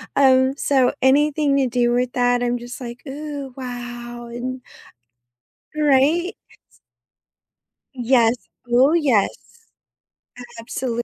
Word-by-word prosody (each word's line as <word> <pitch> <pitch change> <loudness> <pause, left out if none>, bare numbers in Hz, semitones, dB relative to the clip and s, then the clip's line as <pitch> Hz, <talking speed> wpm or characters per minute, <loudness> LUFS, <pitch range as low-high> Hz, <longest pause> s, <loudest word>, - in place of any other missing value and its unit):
um, 265 0 +4
so 265 -3 +2
anything 285 +1 +3
to 265 -2 +2
do 240 0 +1
with 245 +1 0
that, 245 0 +2
I'm 245 0 0
just, 240 +1 -9
like, 245 -1 -8
"Ooh, 285 -1 -6
wow," 240 -1 -7
and 255 +2 -5 1.2
Right? 300 +5 +2 0.3
S - - -28 1.1
Yes. 240 -2 +3 0.4
Ooh, 260 +6 +4
yes. 265 -11 +2 1.3
Absolutely. 235 0 -3
255 Hz, 105 wpm, -21 LUFS, 240-275 Hz, 1.3 s, um